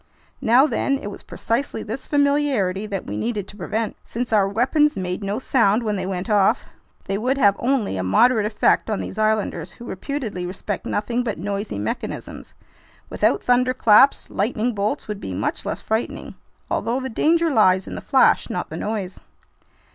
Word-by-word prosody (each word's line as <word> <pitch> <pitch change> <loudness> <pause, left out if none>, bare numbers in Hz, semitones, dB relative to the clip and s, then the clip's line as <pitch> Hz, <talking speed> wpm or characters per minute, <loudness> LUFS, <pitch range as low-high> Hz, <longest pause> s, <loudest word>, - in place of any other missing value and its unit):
Now 245 +5 +5
then, 275 0 0
it 205 -6 -6
was - - -9
precisely 235 +5 -3
this 225 +5 -6
familiarity 280 -10 +1
that 195 -3 -4
we 105 - -5
needed 210 - -2
to - - -11
prevent. 215 +3 -3
Since 235 0 -4
our 200 -2 +4
weapons 265 +7 +2
made 185 +1 -3
no 200 +2 -2
sound 235 -3 +2
when 210 -2 -1
they 185 -1 -3
went 185 -1 -3
off, 205 -3 +3 0.4
they 195 +1 -2
would 255 +5 0
have 200 -7 +4
only 245 - 0
a 95 - -2
moderate 220 - +3
effect 215 +1 +2
on 215 - -1
these 210 - -6
islanders, 215 -6 0
who 240 - -12
reputedly 215 -5 -4
respect 190 +2 -5
nothing 235 +4 -1
but 225 -3 -3
noisy 200 - -4
mechanisms. 105 +2 -5 0.6
Without - - +1
thunderclaps, 250 0 +4
lightning 225 +3 0
bolts 205 0 -2
would 210 -2 -4
be 95 - -5
much 100 - -2
less - - -3
frightening, 220 +2 -3 0.4
although 240 +3 0
the 260 - -4
danger 325 +7 +2
lies 190 -6 +4
in - - -8
the - - -6
flash, - - +3
not - - -4
the - - -5
noise. 205 -4 -4
215 Hz, 175 wpm, -22 LUFS, 195-250 Hz, 0.6 s, Now